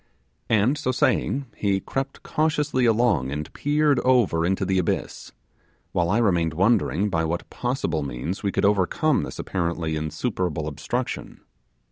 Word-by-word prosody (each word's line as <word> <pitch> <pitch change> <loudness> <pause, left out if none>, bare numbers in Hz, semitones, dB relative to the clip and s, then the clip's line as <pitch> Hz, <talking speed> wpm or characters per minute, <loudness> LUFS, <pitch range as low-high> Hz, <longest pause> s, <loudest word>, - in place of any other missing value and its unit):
And, 115 +7 +3
so 130 -4 0
saying, 130 +2 +1
he 100 -2 +1
crept 135 +6 -4
cautiously 150 -4 +1
along 110 - +2
and 75 +2 -5
peered 145 -2 +2
over 120 -11 +3
into 95 +1 0
the 95 0 +1
abyss, 90 - -3 0.6
while 85 -1 +1
I 105 - +2
remained 85 -8 +2
wondering 100 0 +2
by 80 -2 +1
what 85 +2 -2
possible 120 - -1
means 70 +7 -4
we 100 - 0
could - - +1
overcome 105 - +2
this - - -6
apparently 85 -3 -2
insuperable 80 - -2
obstruction. 120 - -4
100 Hz, 140 wpm, -24 LUFS, 85-125 Hz, 0.6 s, And